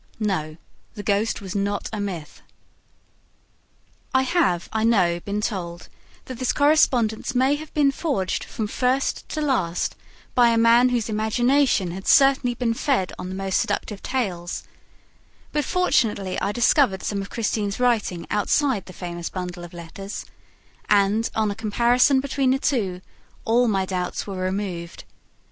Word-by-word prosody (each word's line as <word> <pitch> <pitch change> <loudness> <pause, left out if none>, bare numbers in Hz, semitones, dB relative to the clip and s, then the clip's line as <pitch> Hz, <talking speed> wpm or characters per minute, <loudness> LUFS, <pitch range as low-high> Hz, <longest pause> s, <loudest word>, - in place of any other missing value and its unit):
No, 160 -8 -2 0.4
the 205 - -6
ghost 205 +3 0
was 190 -2 -6
not 200 0 -1
a 215 - -3
myth! 180 -7 -5 1.7
I 260 - +5
have, 260 - +1
I 220 0 0
know, 185 -7 +3
been 205 +4 -3
told 175 -5 -4 0.4
that 255 -2 -8
this 255 -2 +1
correspondence 265 -5 +2
may 260 +3 +3
have 305 +1 -5
been 285 -2 +4
forged 270 - -2
from 220 - -4
first 255 +5 -1
to 310 - -3
last 190 - 0 0.4
by 240 -1 +5
a 230 - +2
man 230 +2 +5
whose 240 -3 0
imagination 220 -1 +2
had 190 +2 -7
certainly 270 -3 +4
been 240 -1 0
fed 235 -6 0
on 180 - -5
the 185 - -5
most 195 0 0
seductive 210 -2 -2
tales; 185 -10 -3 0.9
but 295 -2 0
fortunately 215 - +1
I 200 - 0
discovered 235 -3 +3
some 200 -1 -2
of 195 - -7
Christine's 210 -2 -2
writing 225 -8 +1
outside 210 +2 +1
the 185 - -10
famous 175 -2 -5
bundle 180 -1 -6
of 175 - -9
letters 180 +4 -8 0.6
and, 205 +2 +3
on 215 -2 +1
a - - -5
comparison 240 +5 +3
between 275 -1 0
the 260 - +3
two, 200 -10 -1 0.4
all 240 +2 +3
my 195 -3 +1
doubts 180 -1 -3
were 195 -2 -6
removed. 185 -2 -4
215 Hz, 150 wpm, -23 LUFS, 190-250 Hz, 1.7 s, I